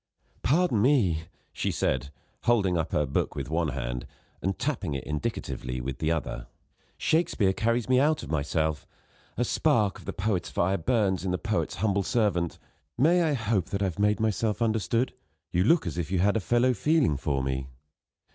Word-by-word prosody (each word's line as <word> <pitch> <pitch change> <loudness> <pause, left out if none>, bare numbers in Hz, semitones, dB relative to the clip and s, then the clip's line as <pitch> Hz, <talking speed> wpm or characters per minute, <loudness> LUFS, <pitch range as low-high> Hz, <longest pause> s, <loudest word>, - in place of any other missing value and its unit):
"Pardon 150 - +2
me," 100 - +3 0.3
she - - -1
said, 65 +1 -1 0.4
holding 100 -7 +3
up 80 -1 -1
her 75 - +2
book 70 - -1
with - - -5
one 80 0 +1
hand, 60 -3 -4 0.3
and 95 +1 -1
tapping 135 - -2
it 70 - -4
indicatively 70 -3 -3
with 65 +2 -5
the 80 +1 +1
other: 80 -7 -3 0.5
"Shakespeare 120 - +2
carries 115 +2 0
me 130 0 +4
out 150 +3 +2
of - - -7
myself. 80 -1 -1 0.5
A - - +1
spark 105 -4 +2
of - - -14
the - - -3
poet's 95 -4 -1
fire 95 +2 +1
burns 95 -1 +1
in 95 - -1
the 90 - 0
poet's 110 +1 -1
humble 100 -2 +1
servant. 95 -6 0 0.4
May 165 +8 +4
I 160 -3 +2
hope 110 - 0
that 100 0 -2
I - - +2
have 95 0 -3
made 105 0 +2
myself 110 0 0
understood? 115 +1 +1 0.4
You 90 +1 +2
look 165 - +4
as 85 0 -3
if 85 - -3
you 95 - +1
had 100 +4 +3
a - - +3
fellow 120 +5 +2
feeling 145 - +2
for 70 -2 -1
me." 65 0 -2
95 Hz, 185 wpm, -27 LUFS, 80-115 Hz, 0.5 s, me